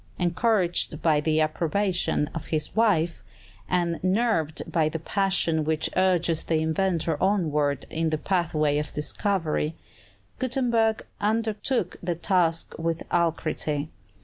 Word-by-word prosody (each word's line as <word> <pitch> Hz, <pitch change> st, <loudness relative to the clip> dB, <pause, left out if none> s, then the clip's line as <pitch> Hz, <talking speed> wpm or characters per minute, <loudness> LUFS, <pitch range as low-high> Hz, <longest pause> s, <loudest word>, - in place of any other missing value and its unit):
Encouraged 175 Hz, -3 st, +1 dB
by 155 Hz, -3 st, +3 dB
the 155 Hz, +1 st, +1 dB
approbation 165 Hz, +1 st, 0 dB
of 165 Hz, -, -5 dB
his 155 Hz, -2 st, -2 dB
wife, 180 Hz, -7 st, +2 dB, 0.5 s
and 175 Hz, -2 st, 0 dB
nerved 185 Hz, -6 st, +1 dB
by 160 Hz, -2 st, +1 dB
that 160 Hz, 0 st, -6 dB
passion 190 Hz, -5 st, +2 dB
which 155 Hz, 0 st, 0 dB
urges 175 Hz, -3 st, +2 dB
the 165 Hz, -, 0 dB
inventor 160 Hz, -1 st, 0 dB
onward 150 Hz, -8 st, +1 dB
in 165 Hz, 0 st, 0 dB
the 155 Hz, -, 0 dB
pathway 155 Hz, -4 st, +1 dB
of 150 Hz, 0 st, -4 dB
discovery, 160 Hz, 0 st, -1 dB, 0.6 s
Gutenberg 235 Hz, -4 st, +1 dB
undertook 220 Hz, 0 st, -1 dB
the 175 Hz, -1 st, -1 dB
task 170 Hz, -2 st, +1 dB
with 165 Hz, 0 st, -1 dB
alacrity. 155 Hz, -3 st, 0 dB
170 Hz, 120 wpm, -26 LUFS, 155-195 Hz, 0.6 s, by